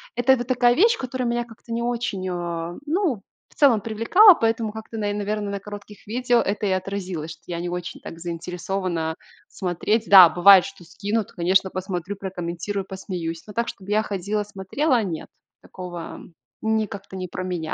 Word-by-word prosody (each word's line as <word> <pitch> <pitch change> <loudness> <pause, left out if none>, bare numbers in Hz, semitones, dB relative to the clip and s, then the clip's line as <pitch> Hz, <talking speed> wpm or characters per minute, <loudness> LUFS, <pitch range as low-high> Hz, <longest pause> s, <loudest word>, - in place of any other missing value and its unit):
это 245 +2 +4
вот 240 0 -5
такая 245 -1 +4
вещь, 455 - +4
которая 255 -1 -3
меня 240 0 -1
как-то 230 0 -14
не 230 - -1
очень, 235 -6 -2
а, 170 -1 -4
ну, 315 - 0 0.3
в - - -25
целом 270 -7 +5
привлекала, 230 - +6
поэтому 225 -3 0
как-то 220 +1 -8
на 205 -1 -1
и, - - -2
наверно, 205 0 -2
на 200 - -3
коротких 205 0 -11
видео 245 +2 +2
это 205 +2 -2
и - - +1
отразилось, 185 -4 -3
что - - -13
я 170 -1 -4
не 175 - -3
очень 180 0 -5
так 165 - -9
заинтересована 175 0 -3 0.3
смотреть. 195 +5 -1
Да, 185 -4 +10
бывает, 185 +2 +7
что 195 -2 -10
скинут, 200 +4 -3
конечно, 185 +2 +2
посмотрю, 185 0 -4
прокомментирую, 190 +1 -4
посмеюсь. 175 -4 -5
Но 210 - -9
так, 235 +3 -1
чтобы 195 +1 -9
я 215 +1 +3
ходила, 205 +1 -2
смотрела, 220 +6 0
нет, 170 -5 -5 0.3
такого 175 -2 -8 0.4
ни 220 0 +1
как-то 200 -1 -9
не 185 -1 -4
про 180 +1 -5
меня. 175 -4 -3
200 Hz, 180 wpm, -23 LUFS, 180-225 Hz, 0.4 s, Да